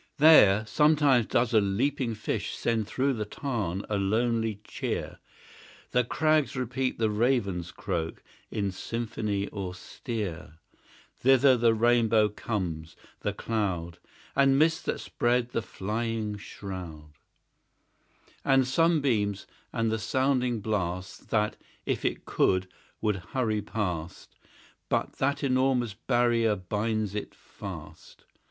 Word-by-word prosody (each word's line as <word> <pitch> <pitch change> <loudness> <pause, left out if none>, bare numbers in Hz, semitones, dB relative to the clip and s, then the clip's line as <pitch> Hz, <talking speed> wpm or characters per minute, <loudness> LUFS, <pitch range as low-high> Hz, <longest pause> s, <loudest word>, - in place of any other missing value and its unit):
There 110 -9 +7
sometimes 145 -1 +4
doth 120 0 +1
a 110 - +6
leaping 120 +4 0
fish 105 - -3
Send 115 -3 0
through 135 +4 0
the 110 -3 -2
tarn 105 - -3
a 105 -2 -1
lonely 110 +1 0
cheer; - - -4 0.7
The 125 - +3
crags 155 +3 +1
repeat 130 +1 -1
the 110 -1 +1
raven's 105 -7 0
croak, 85 -4 -4 0.3
In 100 -3 -1
symphony 105 -1 -3
austere; 90 - -5 0.6
Thither 135 +1 +5
the 115 -1 +3
rainbow 115 -2 +4
comes 85 -7 -4 0.2
the - - -1
cloud 90 -7 -2 0.4
And 135 0 +4
mists 160 +2 +3
that - - -1
spread 120 0 0
the 115 - -1
flying 110 +1 -3
shroud; 90 -7 -8 1.3
And 135 -1 +4
sunbeams; 130 - +2 0.3
and 115 -2 0
the 110 - -1
sounding 125 0 +1
blast, 95 -3 -3
That, 105 -1 +1 0.3
if - - -1
it - - -2
could, 95 0 +2 0.3
would 105 -2 +1
hurry 110 +3 -1
past, 90 -6 -4 0.5
But - - -1
that 140 +2 0
enormous 130 -4 +2
barrier 120 -1 +2
binds 105 +2 -2
it 105 - -5
fast. - - -10
110 Hz, 115 wpm, -28 LUFS, 100-125 Hz, 1.3 s, There